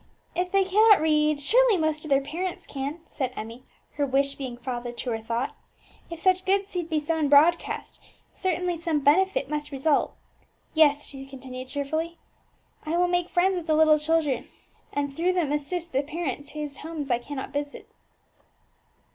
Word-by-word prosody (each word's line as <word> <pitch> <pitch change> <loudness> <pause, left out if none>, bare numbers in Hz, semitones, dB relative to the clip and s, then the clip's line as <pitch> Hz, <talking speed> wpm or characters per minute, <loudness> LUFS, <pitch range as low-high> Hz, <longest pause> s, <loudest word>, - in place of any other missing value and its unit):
"If 360 +1 -1
they 390 0 +4
cannot 420 +3 +6
read, 305 -1 +2
surely 460 - +4
most 315 -2 0
of 310 - -7
their 275 0 +3
parents 345 +6 -4
can," 285 +4 -5
said 260 -3 -2
Emmie, 230 +4 -8 0.3
her 290 - +2
wish 275 +1 +1
being 260 -4 -6
father 240 -1 -4
to 240 +1 -4
her 225 - -1
thought. 230 +3 -3 0.5
"If 335 -1 -7
such 370 +1 +3
good 390 +1 +2
seed 355 -4 -4
be 315 -2 +1
sown 305 -1 0
broadcast, 310 +4 +3 0.3
certainly 360 -1 -1
some 325 -3 -1
benefit 325 +1 +3
must 300 0 -3
result. 280 +2 +1 0.6
Yes," 295 -2 +4
she 270 -1 -9
continued 255 -1 -8
cheerfully, 315 +5 -3 0.7
"I 325 +2 -1
will 355 0 +3
make 355 0 0
friends 375 +2 +2
with 350 -2 -5
the 310 - +3
little 310 -1 +5
children, 300 -4 0 0.4
and 285 -1 -2
through 345 +5 +1
them 340 -6 0
assist 335 +4 -3
the 270 - +2
parents 290 -2 -5
whose 295 -2 -5
homes 305 -4 -5
I 240 - +2
cannot 270 +2 -6
visit." 285 0 -4
305 Hz, 170 wpm, -26 LUFS, 275-345 Hz, 0.7 s, cannot